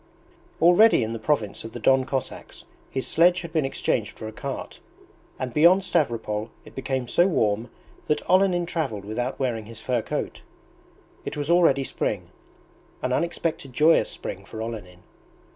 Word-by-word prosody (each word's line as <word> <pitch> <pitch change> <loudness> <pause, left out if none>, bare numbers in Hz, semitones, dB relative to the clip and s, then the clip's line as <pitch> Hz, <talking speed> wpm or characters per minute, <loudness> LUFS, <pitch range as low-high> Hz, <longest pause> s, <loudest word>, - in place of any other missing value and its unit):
Already 175 - +6
in 110 +1 -3
the 115 - -5
province 110 -5 -1
of 115 0 -8
the 120 - -6
Don 130 +3 +4
Cossacks 135 -1 -5 0.2
his 130 - -3
sledge 175 +2 +4
had 170 -2 -9
been 155 -4 +2
exchanged 115 -4 -1
for 110 - -6
a - - -6
cart, 135 +4 -6 0.6
and 130 -2 -4
beyond 175 +7 +5
Stavropol 115 - -1 0.2
it - - -13
became 130 -1 -3
so 175 +8 +4
warm 110 - 0 0.4
that 150 -1 0
Olenin 185 -1 +3
travelled 140 - -3
without 120 +5 -3
wearing 115 -5 -2
his 115 -1 -10
fur 120 +1 0
coat. - - -4 0.8
It - - -5
was 145 +2 -1
already 165 -6 +4
spring - - -3 0.7
an 130 - 0
unexpected 165 -4 -2
joyous 155 +5 +4
spring - - -6
for 110 - -9
Olenin. 105 -6 -7
130 Hz, 160 wpm, -25 LUFS, 115-165 Hz, 0.8 s, Already